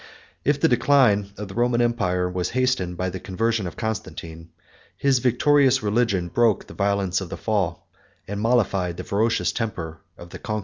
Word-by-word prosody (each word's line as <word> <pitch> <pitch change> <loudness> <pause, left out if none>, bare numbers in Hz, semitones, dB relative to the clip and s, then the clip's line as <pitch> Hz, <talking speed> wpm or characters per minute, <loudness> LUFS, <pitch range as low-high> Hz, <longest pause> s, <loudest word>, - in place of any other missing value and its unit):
If 145 0 +1
the - - +4
decline 120 -5 +3
of 105 0 -6
the 95 - -9
Roman 120 +1 +1
empire 95 -7 +1
was 90 0 -2
hastened 125 -9 0
by 95 +1 -2
the 95 - -6
conversion 110 +2 -1
of - - -9
Constantine, 85 -7 -5 0.5
his 135 -2 +2
victorious 135 +1 +3
religion 105 -4 +1
broke 115 0 +2
the - - -12
violence 100 -2 0
of 95 - -6
the - - -6
fall, 100 -6 -2 0.4
and 100 +1 -4
mollified 95 -7 +1
the - - -5
ferocious 110 +2 +1
temper 85 -9 -4 0.2
of 85 0 -12
the - - -8
conquerors. 110 -1 -3
105 Hz, 175 wpm, -23 LUFS, 90-120 Hz, 0.5 s, the